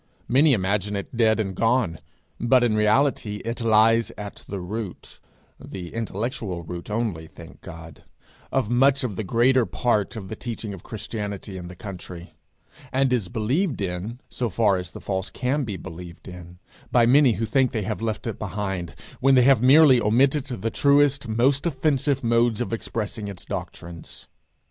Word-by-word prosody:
Many 140 Hz, +4 st, +5 dB
imagine 100 Hz, 0 st, 0 dB
it 100 Hz, +4 st, -5 dB
dead 110 Hz, -1 st, +3 dB
and 95 Hz, -3 st, -1 dB
gone, 115 Hz, -5 st, +1 dB, 0.4 s
but 120 Hz, +1 st, +4 dB
in 120 Hz, -3 st, +2 dB
reality 110 Hz, 0 st, +2 dB
it 115 Hz, +1 st, -4 dB
lies 115 Hz, +1 st, +4 dB
at 105 Hz, -1 st, -8 dB
the 100 Hz, -, -4 dB
root 100 Hz, +2 st, -7 dB, 0.4 s
(the 90 Hz, -3 st, -8 dB
intellectual 110 Hz, -4 st, -4 dB
root 85 Hz, +3 st, -7 dB
only, 105 Hz, -8 st, -2 dB
thank -, -, -14 dB
God) 80 Hz, -1 st, -11 dB, 0.5 s
of 135 Hz, -5 st, +1 dB
much 135 Hz, +4 st, +3 dB
the 110 Hz, -4 st, -3 dB
greater 120 Hz, +6 st, +3 dB
part 115 Hz, -2 st, 0 dB
of 105 Hz, -4 st, -7 dB
the 110 Hz, -, -6 dB
teaching 115 Hz, -3 st, -6 dB
of 95 Hz, -, -9 dB
Christianity 105 Hz, -2 st, -6 dB
in 90 Hz, -1 st, -7 dB
the 90 Hz, -, -10 dB
country; 90 Hz, -3 st, -9 dB, 0.6 s
and 130 Hz, 0 st, +2 dB
is 115 Hz, -7 st, 0 dB
believed 130 Hz, -, -1 dB
in 100 Hz, +5 st, -4 dB
so 120 Hz, -2 st, -3 dB
far 105 Hz, -2 st, +2 dB
as 90 Hz, -2 st, -5 dB
the -, -, -10 dB
false 95 Hz, -1 st, -3 dB
can 135 Hz, +3 st, -1 dB
be 100 Hz, -4 st, -4 dB
believed 85 Hz, -1 st, -10 dB
in 90 Hz, -1 st, -10 dB, 0.3 s
by 120 Hz, -2 st, +5 dB
many 130 Hz, 0 st, +5 dB
who 115 Hz, -, -2 dB
think 130 Hz, +2 st, +2 dB
they 110 Hz, -3 st, -2 dB
have 110 Hz, +2 st, -3 dB
left 110 Hz, +1 st, -3 dB
it 115 Hz, -4 st, -4 dB
behind, 95 Hz, -6 st, -4 dB, 0.2 s
when 135 Hz, +1 st, +4 dB
they 125 Hz, -, +6 dB
have 135 Hz, -2 st, +5 dB
merely 130 Hz, -1 st, +7 dB
omitted 130 Hz, +6 st, +2 dB
the 115 Hz, -4 st, -4 dB
truest, 140 Hz, -1 st, +3 dB
most 130 Hz, +8 st, +2 dB
offensive 140 Hz, -2 st, 0 dB
modes 115 Hz, -1 st, +2 dB
of 120 Hz, -1 st, -3 dB
expressing 110 Hz, -1 st, -4 dB
its 95 Hz, -3 st, -7 dB
doctrines. 85 Hz, -1 st, -8 dB
110 Hz, 170 wpm, -24 LUFS, 95-125 Hz, 0.6 s, merely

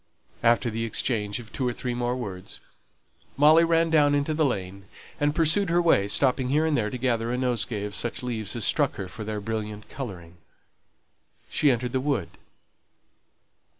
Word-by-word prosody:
After 120 Hz, 0 st, +3 dB
the 115 Hz, +1 st, -3 dB
exchange 110 Hz, -2 st, -1 dB
of 115 Hz, -2 st, -10 dB
two 130 Hz, -, -1 dB
or 120 Hz, -, -1 dB
three 125 Hz, 0 st, -4 dB
more 120 Hz, 0 st, -1 dB
words, 95 Hz, -7 st, -6 dB, 0.8 s
Molly 155 Hz, +3 st, +6 dB
ran 165 Hz, 0 st, +2 dB
down 145 Hz, -2 st, +4 dB
into 145 Hz, +2 st, 0 dB
the 155 Hz, +1 st, +1 dB
lane, 100 Hz, -7 st, -3 dB, 0.3 s
and 145 Hz, 0 st, +1 dB
pursued 170 Hz, +4 st, +2 dB
her 170 Hz, +1 st, +3 dB
way, 165 Hz, -, +3 dB
stopping 130 Hz, +3 st, +2 dB
here 150 Hz, +4 st, +2 dB
and 160 Hz, -2 st, +1 dB
there 105 Hz, -4 st, 0 dB
to 125 Hz, -, -5 dB
gather 120 Hz, -2 st, 0 dB
a 125 Hz, -, -1 dB
nosegay 120 Hz, -4 st, -1 dB
of 105 Hz, 0 st, -5 dB
such 120 Hz, +3 st, -2 dB
leaves 115 Hz, -4 st, -3 dB
as 115 Hz, -, -1 dB
struck -, -, +1 dB
her 95 Hz, -, -5 dB
for 110 Hz, -, -8 dB
their 105 Hz, 0 st, -4 dB
brilliant 105 Hz, 0 st, -5 dB
colouring. 90 Hz, -10 st, -8 dB, 1.1 s
She 150 Hz, -, +3 dB
entered 125 Hz, -1 st, 0 dB
the 130 Hz, -, 0 dB
wood. 130 Hz, -, -1 dB
120 Hz, 180 wpm, -26 LUFS, 105-145 Hz, 1.1 s, Molly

